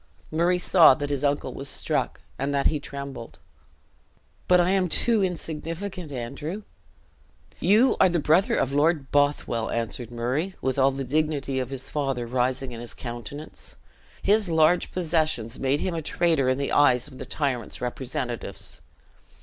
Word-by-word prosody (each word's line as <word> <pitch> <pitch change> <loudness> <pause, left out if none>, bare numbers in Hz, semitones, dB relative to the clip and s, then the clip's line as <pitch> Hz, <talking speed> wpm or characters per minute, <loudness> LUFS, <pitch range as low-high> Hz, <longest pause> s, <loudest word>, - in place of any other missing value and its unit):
Murray 170 +3 +2
saw 170 -5 +6
that 145 +1 -4
his 140 -1 -1
uncle 145 0 0
was 135 0 -6
struck, - - -1 0.2
and 135 +2 -1
that 140 - 0
he 150 - +2
trembled. 140 -4 -8 1.1
"But 180 0 +5
I 175 +1 +3
am 190 -2 +2
too 225 +4 +5
insignificant, 170 0 -4
Andrew!" 150 - -5 1.0
"You 225 +7 +4
are 190 - +6
the 175 - 0
brother 165 +5 +3
of 135 - 0
Lord 145 -1 +1
Bothwell!" 145 -5 +1
answered 115 0 -3
Murray, 130 +10 -2
with 130 +1 -1
all 135 +1 +5
the 135 0 -4
dignity 140 -1 -1
of 130 -1 -3
his 135 -1 -5
father 135 -5 -1
rising 125 +2 -1
in 115 -1 -7
his 120 - -6
countenance. 120 +5 -7 0.5
"His 205 -1 +3
large 160 +2 +3
possessions 155 -9 -1
made 135 +2 +1
him 185 - -1
a 165 - -2
traitor 155 -4 +1
in 130 - +1
the 140 - -2
eyes 125 -3 +4
of 130 -3 -13
the - - -6
tyrant's 125 -8 -2
representatives. 125 -1 -5
145 Hz, 160 wpm, -25 LUFS, 130-165 Hz, 1.1 s, saw